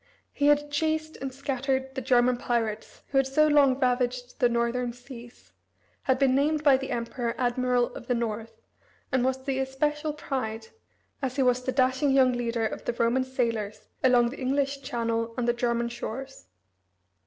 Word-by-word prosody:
He 285 - +1
had 295 0 +3
chased 315 +1 -1
and 270 0 -5
scattered 265 0 -2
the 265 - -4
German 245 0 +3
pirates 225 -3 -3
who 270 - +3
had 270 - +2
so 305 +3 +3
long 285 -3 +4
ravaged 250 -1 -1
the 245 - +4
northern 235 +1 0
seas, 245 -1 -13 0.5
had 260 -1 +1
been 265 -1 +3
named 295 +3 +1
by 285 -3 +6
the 265 0 -6
Emperor 235 0 -3
admiral 250 0 +1
of 240 - -10
the 245 - +1
north, 225 -1 -4 0.5
and 260 -2 +2
was 260 0 -1
the 265 -1 -1
especial 295 +3 -1
pride, 225 -7 -4 0.5
as 260 -2 -2
he 275 - +2
was 250 0 +2
the 260 - -1
dashing 260 +2 +2
young 265 -2 +4
leader, 235 -2 -1
of - - -4
the - - -1
Roman 235 +3 +1
sailors 230 -5 -3
along 245 -2 +5
the 285 - -9
English 275 +1 0
Channel 230 -2 -2
and 245 -1 -1
the 240 - +3
German 235 -1 0
shores. 240 - -7
255 Hz, 175 wpm, -27 LUFS, 235-270 Hz, 0.5 s, by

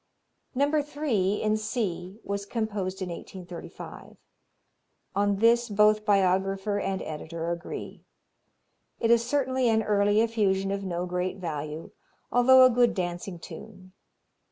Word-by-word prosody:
No. 290 +3 +2
3, 260 -10 -1
in 215 0 +2
C, 205 -4 -3
was 200 0 -4
composed 200 -4 -3
in 180 - -5
1835. 175 0 -9 1.0
On 200 0 +2
this 235 +3 +3
both 210 +1 +3
biographer 195 0 +2
and 195 -1 -2
editor 165 +2 -5
agree. 170 0 -6 1.0
It 230 - +2
is 235 0 +5
certainly 260 -1 +1
an 220 0 +2
early 205 0 +3
effusion 195 -4 +1
of 200 0 -2
no 175 -2 -2
great 180 +1 -2
value, 155 -3 -5 0.4
although 255 +1 +7
a 255 - +5
good 240 0 +3
dancing 175 0 -3
tune. 185 +1 -11
200 Hz, 125 wpm, -27 LUFS, 185-230 Hz, 1.0 s, although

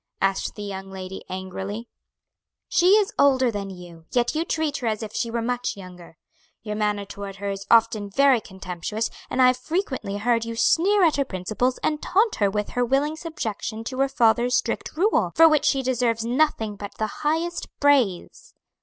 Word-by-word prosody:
asked 195 0 0
the 210 - -7
young 195 -1 -6
lady 190 0 -7
angrily. 190 +4 -5 0.8
"She 360 +2 +4
is 420 -2 +3
older 260 -3 +4
than 200 -2 -4
you, 175 -3 -11
yet 240 -1 +1
you 315 +1 0
treat 315 -3 -1
her 245 - -3
as 220 0 -1
if 215 -1 -7
she 235 - -2
were 230 0 -2
much 245 -2 -2
younger. 180 -3 -12 0.5
Your 210 -1 -4
manner 210 -1 -1
toward 200 0 -8
her 200 0 -4
is 195 0 -7
often 225 -3 +3
very 270 +2 +4
contemptuous, 190 +4 -4 0.2
and - - -3
I - - +8
have 255 0 +4
frequently 260 - -3
heard 230 +2 +1
you 230 0 -5
sneer 370 - +3
at 320 -4 +3
her 280 - +2
principles 215 +5 -2
and 300 -1 0
taunt 420 +5 +2
her 200 -2 +2
with 210 +1 -2
her 245 - 0
willing 275 +5 +1
subjection 225 - -5
to 255 +3 -5
her 275 0 +2
father's 240 -1 +3
strict - - -2
rule; 320 - +2
for 325 +1 +8
which 305 -2 +3
she 270 -1 +2
deserves 240 -3 0
nothing 235 -5 0
but 200 0 -8
the 215 -1 -4
highest 325 +3 -1
praise." 260 -11 +1
230 Hz, 190 wpm, -24 LUFS, 200-275 Hz, 0.8 s, I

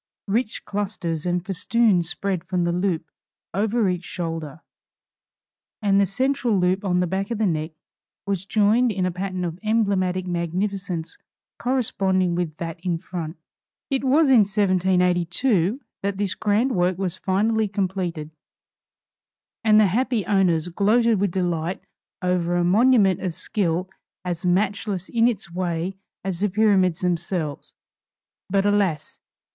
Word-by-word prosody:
Rich 215 +3 -1
clusters 185 -5 -3
and 175 0 -1
festoons 195 -2 +2
spread 190 -3 -2
from 180 0 -1
the 170 - +1
loop 175 -3 -1 0.4
over 215 +3 +1
each 180 -1 -1
shoulder, 165 -4 -5 1.2
and 200 -2 +3
the 200 - +2
central 250 0 0
loop 185 +2 +1
on 180 -2 +1
the - - +2
back 190 +3 -2
of 235 - -2
the 220 - +1
neck 155 -3 -1 0.5
was 195 -1 -2
joined 220 +4 +3
in 190 -3 -1
a 185 - 0
pattern 185 0 -3
of 170 +1 -5
emblematic 200 -4 +1
magnificence 180 0 -3 0.4
corresponding 195 -8 +1
with 170 -3 -2
that 165 -1 -5
in 175 -3 0
front. 165 -1 -6 0.5
It 270 0 0
was 275 +2 +4
in 250 - +7
1782 185 +1 +2 0.2
that 200 0 -2
this 200 -2 -1
grand 220 +5 +1
work 180 -4 +1
was 185 -2 -2
finally 215 +4 +1
completed, 185 -5 -3 1.3
and 215 -1 +6
the 215 - +6
happy 230 +2 0
owners 180 -5 +2
gloated 215 +4 +3
with 200 0 +1
delight 175 -1 -1 0.4
over 175 -1 +1
a 175 - +2
monument 200 0 +4
of 180 -4 -3
skill 180 -1 -1 0.4
as 175 0 -2
matchless 195 0 0
in 230 0 +3
its 200 -7 -3
way 175 0 -2 0.3
as 185 -3 -3
the 205 +1 +1
Pyramids 190 -3 +2
themselves. 170 -4 -2 0.7
But, 195 +1 +2
alas! 195 -7 0
190 Hz, 140 wpm, -23 LUFS, 175-205 Hz, 1.3 s, in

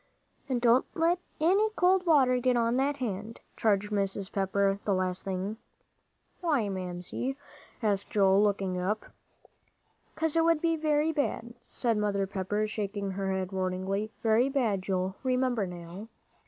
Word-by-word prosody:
"And 255 -2 +1
don't 240 +1 +4
let 335 +2 +2 0.2
any 390 +7 +3
cold 365 0 +3
water 260 -6 +5
get 250 0 +2
on 235 +1 +2
that 280 +2 +1
hand," 220 -2 -4 0.2
charged 210 -1 +1
Mrs. 195 -1 -1
Pepper 195 0 +1
the 200 - +1
last 185 0 -1
thing. 195 +3 -3 0.8
"Why, 290 - +1
Mamsie?" 185 +8 -4 0.5
asked 200 -2 0
Joel, 195 -1 +4
looking 195 -3 0
up. 210 +4 -1 1.1
"'Cause 320 -1 0
it 330 - +4
would 330 -1 +3
be 330 0 +1
very 305 0 +1
bad," 275 -6 -2
said 230 -3 -1
Mother 200 -2 0
Pepper, 200 +2 -2
shaking 200 -2 -3
her 190 0 -2
head 190 0 -2
warningly, 190 +2 -2
"very 230 +4 +3
bad, 235 -8 0
Joel. 190 0 -2
Remember, 250 -5 +1
now." 175 +4 -8
210 Hz, 145 wpm, -29 LUFS, 195-260 Hz, 1.1 s, water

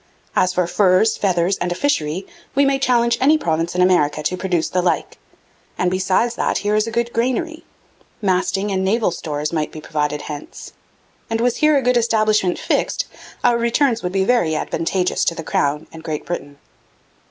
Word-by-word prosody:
As 185 - +3
for 180 -1 +1
furs, 185 +4 +3
feathers, 185 -1 +1
and 180 - -2
a - - -1
fishery, 180 - -1 0.3
we 280 +1 +4
may 275 0 +2
challenge 235 -2 +2
any 300 +4 +5
province 165 - -1
in 180 - +3
America 155 -5 +2
to 180 - 0
produce 180 -3 -1
the 180 - 0
like, 175 -1 -1 0.6
and 180 0 +1
beside 190 +5 +1
that 235 - -1
here 205 - +2
is 215 +1 +2
a - - -4
good 235 +1 -1
grainery; 260 +8 -1 0.6
masting 195 +1 0
and 190 -1 0
naval 210 +1 +1
stores 150 -1 -4
might 155 -2 -1
be 155 - -8
provided 150 -1 -2
hence. 150 -1 -8 0.6
And 225 0 -1
was 240 0 +1
here 305 -1 +4
a 270 - 0
good 250 0 +3
establishment 215 -5 +2
fixt - - -1 0.4
our 235 -1 +3
returns 235 0 +1
would 180 - -3
be 190 0 +1
very 195 -10 +2
advantageous 180 +4 -1
to 170 - +1
the 165 - -6
Crown 150 +1 0
and 160 0 -10
Great 155 -2 -4
Britain.' 145 -5 -5
185 Hz, 185 wpm, -20 LUFS, 165-235 Hz, 0.6 s, any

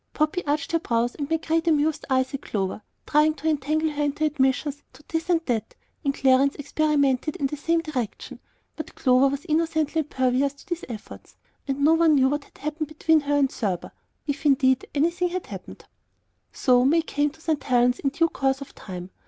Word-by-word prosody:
Poppy 310 +4 0
arched 290 0 -1
her 330 - +2
brows 235 -5 0
and 285 -1 -5
made 325 0 -1
great 325 +1 0
amused 310 -1 +1
eyes 260 0 +1
at 275 - -4
Clover, 195 0 -3 0.2
trying 305 +1 +3
to 310 +2 -5
entangle 310 +1 0
her 295 0 -3
into 295 +1 0
admissions 285 0 0
as - - -31
to 270 +4 -17
this 325 +2 -3
or 345 -2 +4
that, 225 -4 -2 0.3
and 280 -2 0
Clarence 270 +1 +3
experimented 290 -1 +1
in 280 - -2
the 275 - -2
same 330 +3 0
direction; 260 -9 -5 0.4
but 315 - -8
Clover 255 +1 +4
was 280 +4 -3
innocently 320 -1 0
impervious 265 -2 0
to 280 - -18
these 350 -2 -4
efforts, 220 -3 -10 0.3
and 275 0 -2
no 305 +3 +5
one 330 +1 +3
ever - - +5
knew 265 -1 +4
what 290 +1 -2
had - - -22
happened 305 +1 -3
between 310 +1 +2
her 290 0 -1
and 275 -2 +2
Thurber, 190 -6 -3 0.3
if, 285 -1 -3
indeed, 260 -3 +3
anything 340 +5 +1
had 365 +1 -4
happened. - - -10 0.7
So 250 -1 +3
May 320 +5 +3
came 295 -2 0
to 315 +3 -19
St. 320 -2 -1
Helen's 245 -1 +2
in 275 - 0
due 330 +4 +2
course, 270 -2 0
of 280 - -10
time. 180 -1 -8
290 Hz, 200 wpm, -25 LUFS, 265-315 Hz, 0.7 s, no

